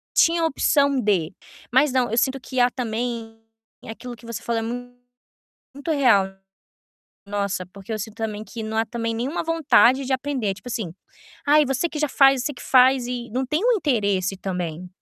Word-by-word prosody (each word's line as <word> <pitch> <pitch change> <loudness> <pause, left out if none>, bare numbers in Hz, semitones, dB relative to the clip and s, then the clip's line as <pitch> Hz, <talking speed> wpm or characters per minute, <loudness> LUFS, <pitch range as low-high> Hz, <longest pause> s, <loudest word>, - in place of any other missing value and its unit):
tinha 335 0 +4
a - - +3
opção 280 -2 +2
de 195 -8 +1 0.4
mas 265 +2 +4
não, 250 -3 +1
eu 225 - -1
sinto 265 +2 +1
que 255 0 -3
há 245 0 +5
também 230 -2 -4 0.4
aquilo 240 +2 -8
que 235 - -18
você 230 -1 -6
falou 235 -1 -1
é - - -4
mu 245 +2 -6 0.8
muito 285 +4 -3
real, 245 -10 +4 1.0
nossa, 200 -2 -2
porque 195 +3 -10
eu 215 - -2
sinto 215 +1 -7
também 215 -2 -4
que 225 0 -7
não 220 0 -4
há 225 - +2
também 230 0 -3
nenhuma 255 +10 -2
vontade 275 -5 +4
de 265 - -2
aprender, 260 -4 -1
é 195 - 0
tipo 190 +6 -11
assim: 220 -8 -4 0.5
"Ai, 300 +1 +5
você 270 +5 0
que 310 - -6
já 300 - +1
faz", 270 -1 +4
"Você 295 - -2
que 250 - -12
faz", 255 -1 +4
e 245 -1 -4
não 260 +3 -1
tem 305 +6 0
o - - +5
interesse 200 - 0
também. 180 -2 -4
245 Hz, 195 wpm, -23 LUFS, 220-270 Hz, 1.0 s, há